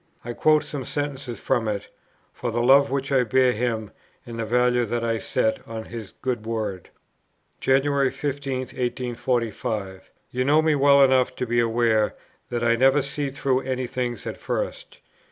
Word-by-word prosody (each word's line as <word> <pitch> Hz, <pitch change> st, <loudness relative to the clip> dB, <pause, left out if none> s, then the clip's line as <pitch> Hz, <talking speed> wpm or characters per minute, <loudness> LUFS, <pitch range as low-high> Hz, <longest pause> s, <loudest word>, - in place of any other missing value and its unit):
I 120 Hz, -, -4 dB
quote 155 Hz, +4 st, +3 dB
some 140 Hz, -3 st, -5 dB
sentences 140 Hz, -3 st, -4 dB
from 120 Hz, -4 st, 0 dB
it, 105 Hz, -2 st, -3 dB, 0.5 s
for 120 Hz, -, -4 dB
the 120 Hz, +1 st, -1 dB
love 140 Hz, +3 st, +6 dB
which 135 Hz, +1 st, -2 dB
I 130 Hz, -2 st, +4 dB
bear 125 Hz, +2 st, +3 dB
him 110 Hz, -2 st, -2 dB, 0.3 s
and 115 Hz, -1 st, -7 dB
the 115 Hz, -, -1 dB
value 125 Hz, +1 st, +2 dB
that 115 Hz, +1 st, -2 dB
I 115 Hz, -1 st, 0 dB
set 110 Hz, -, 0 dB
on 110 Hz, -1 st, -6 dB
his 115 Hz, -5 st, -8 dB
good 125 Hz, -4 st, -1 dB
word. 105 Hz, -5 st, -3 dB, 0.7 s
"January 135 Hz, 0 st, +2 dB
15, 140 Hz, -2 st, -3 dB
1845. 120 Hz, -6 st, -3 dB, 0.2 s
You 125 Hz, +1 st, 0 dB
know 150 Hz, +4 st, +4 dB
me 160 Hz, -1 st, +3 dB
well 140 Hz, -1 st, +6 dB
enough 130 Hz, -1 st, +3 dB
to 125 Hz, -, -2 dB
be 120 Hz, 0 st, +1 dB
aware, 115 Hz, -2 st, +2 dB, 0.3 s
that 120 Hz, -1 st, -2 dB
I 115 Hz, 0 st, +4 dB
never 135 Hz, +3 st, +4 dB
see 140 Hz, +1 st, -3 dB
through 135 Hz, -1 st, 0 dB
any 130 Hz, -1 st, -2 dB
thing 125 Hz, -1 st, -3 dB
at -, -, -5 dB
first. -, -, -4 dB
125 Hz, 170 wpm, -24 LUFS, 115-135 Hz, 0.7 s, love